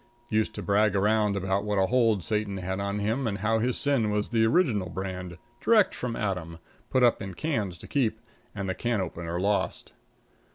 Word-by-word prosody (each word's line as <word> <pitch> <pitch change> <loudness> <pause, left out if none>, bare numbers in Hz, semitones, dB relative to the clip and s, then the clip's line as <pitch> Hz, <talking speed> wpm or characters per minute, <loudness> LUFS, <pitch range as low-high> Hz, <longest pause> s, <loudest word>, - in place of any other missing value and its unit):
Used 110 -1 0
to - - -5
brag 105 0 +2
around 105 +1 +2
about 95 +1 0
what 105 -1 -1
a 95 - +4
hold 115 -4 +2
Satan 105 0 -1
had 95 +1 -3
on 100 +1 -2
him 110 +5 0
and 100 -2 -2
how 110 +2 +1
his 125 +2 0
sin 135 -7 +2
was 105 0 -1
the 115 -1 +3
original 110 - +2
brand, 90 -2 -5 0.3
direct 220 -4 +4
from 120 -2 -4
Adam, 90 -6 -3 0.3
put 130 - +2
up 120 - +4
in 95 -2 -6
cans 105 - -2
to - - -12
keep, 115 -6 0 0.4
and 100 -1 -3
the 95 - 0
can 120 +2 -1
opener 85 -1 -3
lost. 100 +2 -1
105 Hz, 195 wpm, -27 LUFS, 95-115 Hz, 0.4 s, a